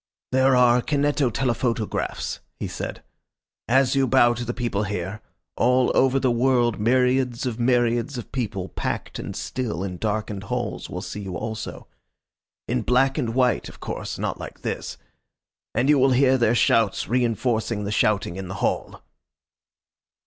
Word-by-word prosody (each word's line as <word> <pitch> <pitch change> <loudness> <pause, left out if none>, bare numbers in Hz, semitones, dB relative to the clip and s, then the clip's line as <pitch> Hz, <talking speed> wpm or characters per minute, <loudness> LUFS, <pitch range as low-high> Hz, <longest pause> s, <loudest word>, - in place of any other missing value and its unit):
"There 130 0 +4
are 125 -1 +5
kineto 145 -1 +1
telephoto 120 -2 0
graphs," - - -3 0.2
he - - -3
said. - - -6 0.6
"As 130 +2 +3
you 135 -1 +3
bow 120 -2 +5
to 120 +1 -4
the 120 - -2
people 120 -5 -2
here 100 +2 -4 0.3
all 125 +1 +3
over 135 +1 +4
the 130 -2 +2
world 120 -2 +2
myriads 125 +2 +2
of 125 -2 -3
myriads 120 +1 +1
of 120 - -7
people, 100 -7 -3
packed - - -4
and - - -6
still 110 -8 -3
in 90 -2 -4
darkened 105 -1 -3
halls, 120 0 -3
will 90 +1 -5
see - - -6
you 95 -3 -5
also. 110 +3 -5 0.8
In - - 0
black 135 +3 +2
and 115 -4 -2
white, 125 -1 +2
of - - -14
course - - -5
not - - -3
like - - -9
this. - - -4 0.8
And 130 - +2
you 145 -1 +5
will 130 0 +4
hear 130 +1 +4
their 120 -2 +3
shouts 110 -3 +2
reinforcing 115 -2 0
the 100 - -3
shouting 100 -4 +1
in 95 -1 -5
the 95 - -6
hall. - - -2
120 Hz, 160 wpm, -24 LUFS, 110-130 Hz, 0.8 s, are